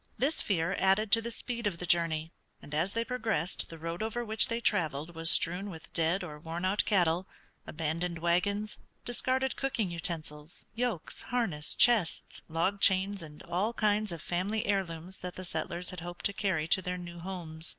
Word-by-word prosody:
This 285 +5 +2
fear 190 -1 +1
added 195 +2 +3
to 230 - +7
the 235 - -4
speed 235 -1 -3
of 185 -5 -2
the 180 - -3
journey, 165 -2 +2 0.3
and 145 - -11
as 170 +6 +1
they 230 0 0
progressed 220 -9 -1
the 165 - -8
road 165 +3 -4
over 225 +2 -2
which 220 0 +4
they 230 0 -1
traveled 165 - +1
was 165 0 +2
strewn 180 +5 +5
with 160 -4 -10
dead 165 +4 +1
or 150 -4 -7
worn 165 +3 -4
out 195 +3 +3
cattle, 180 -2 +2 0.4
abandoned 165 +2 -2
wagons, 200 +5 +1 0.3
discarded 260 +2 0
cooking 230 -8 -1
utensils, 155 -2 -4
yokes, 230 -7 -2
harness, 210 -12 -1
chests, 225 -8 +3
log 170 +5 0
chains, 195 +1 +4
and 150 -2 -10
all 205 +7 0
kinds 210 -2 +2
of 170 - -6
family 195 +5 -1
heirlooms 185 -3 -2
that 180 0 -6
the 185 - -6
settlers 170 +2 -3
had 180 - -7
hoped 175 +1 -7
to 200 - +2
carry 185 -6 0
to 190 - +4
their 180 0 -3
new 175 -1 -8
homes. 170 -3 -5
180 Hz, 180 wpm, -31 LUFS, 165-210 Hz, 0.4 s, to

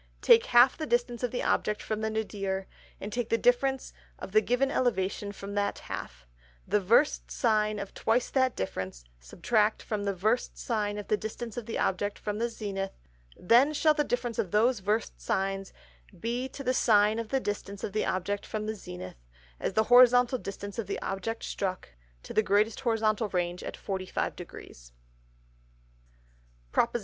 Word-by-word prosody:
_ - - -33
Take 470 0 +6
half 245 +6 +6
the 310 - -3
Distance 240 -1 0
of 245 - 0
the 245 - -3
Object 210 0 +1
from 215 0 -3
the 220 - 0
Nadir, 195 -3 -2 0.3
and 205 +1 -6
take 240 -2 -2
the 230 - +3
Difference 260 +3 +1 0.2
of - - -8
the 215 +2 +5
given 250 +4 +1
Elevation 200 -6 0
from 200 0 -8
that 200 0 0
half; 60 0 -7 0.4
the 210 - +3
Versed 230 +10 +3
Sine 215 -3 +1
of 200 -1 -6
twice 235 +2 0
that 260 -2 +2
Difference 95 -9 -4 0.2
subtract 210 - 0
from 210 -2 -3
the 200 -1 -1
Versed 215 +7 0
Sine 210 -3 -2
of 205 - -6
the 210 - +2
Distance 220 +1 -6
of 240 -3 -6
the 230 - -3
Object 205 +2 0
from 210 0 -4
the 235 +1 0
Zenith: 195 -4 -4 0.4
Then 245 +10 +4
shall 310 +1 +4
the 300 0 +1
Difference 245 -4 -2
of 190 - 0
those 225 +5 +3
Versed 210 +3 -1
Sines 195 0 -1 0.5
be 240 +6 -2
to 275 - -8
the 255 0 +1
Sine 215 -2 +4
of 230 -2 -5
the 270 - +1
Distance 200 -3 -5
of 200 - -4
the 215 - +1
Object 195 +2 -1
from 215 -1 -4
the 215 - -2
Zenith, 90 - -9 0.4
as - - -2
the 220 - +3
Horizontal 245 +1 +6
Distance 200 +1 -7
of 215 - -3
the 200 - -3
Object 210 +4 -3
strook, 185 -2 -3 0.3
to - - -8
the - - +4
greatest 210 +1 +2
Horizontal 220 -3 +1
Range 175 -1 -1
at - - -5
45°. 190 -2 -3 2.4
_PROP. 235 0 +2
II. - - +2
215 Hz, 180 wpm, -29 LUFS, 200-240 Hz, 2.4 s, Take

